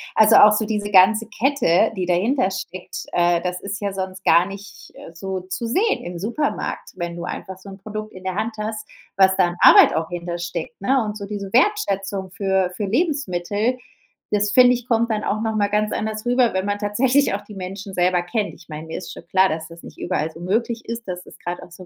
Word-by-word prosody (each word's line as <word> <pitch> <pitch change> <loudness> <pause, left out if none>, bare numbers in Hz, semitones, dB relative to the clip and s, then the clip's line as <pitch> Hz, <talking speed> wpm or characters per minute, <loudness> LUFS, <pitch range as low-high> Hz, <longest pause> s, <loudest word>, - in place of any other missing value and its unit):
Also, 220 0 +6
auch 210 0 +8
so 215 +1 0
diese 210 -1 -2
ganze 210 +3 +5
Kette, 225 -5 +2
die 185 -2 -2
dahinter 195 +6 +2
steckt, 185 -1 -7
äh, 175 0 +2
das 180 0 -3
ist 200 +1 -5
ja 200 -2 -3
sonst 190 0 -5
gar 170 +3 +5
nicht, 200 0 -11
äh, 165 - -12
so 190 +2 -5
zu 185 +6 -5
sehen 410 - +1
im 175 0 -6
Supermarkt, 235 - -3
wenn 175 -1 -4
du 170 - -6
einfach 190 -1 -7
so 195 - -12
'n 195 - -10
Produkt 215 +2 -7
in 185 0 -11
der 185 - -2
Hand 220 +4 -2
hast, 215 0 -4 0.3
was 190 0 +5
da 185 - +5
an 175 - -7
Arbeit - - +8
auch 160 +1 -2
hinter 175 0 -5
steckt, 170 +5 -5
ne? 260 +3 +2
Und 210 - -4
so 200 - -7
diese 200 -1 -6
Wertschätzung 200 - +1
für 190 -2 0
für 205 - -2
Lebensmittel, 225 - -1 0.5
das 205 0 +1
finde 250 -1 +6
ich, 245 0 -5
kommt 235 -1 +1
dann 215 -1 -1
auch 215 +2 -1
nochmal 215 -2 0
ganz 210 +1 0
anders 215 +1 -3
rüber, 245 -2 +2
wenn 190 - 0
man 205 0 -1
tatsächlich 245 +4 +2
auch 205 - -5
die 210 - -13
Menschen 195 +1 -7
selber 180 -1 +2
kennt. 205 +4 -2
Ich - - -18
meine, 155 +1 -8
mir 160 - -5
ist - - -7
schon - - -12
klar, 190 +2 +4
dass 160 0 -4
das 170 0 -14
nicht - - -12
überall 160 -3 -2
so 165 - -13
möglich 225 +6 -1
ist, 230 -1 -6
dass 180 -1 -5
es - - -14
grad 175 0 -5
auch - - -12
so 180 +1 -12
200 Hz, 230 wpm, -21 LUFS, 180-220 Hz, 0.5 s, auch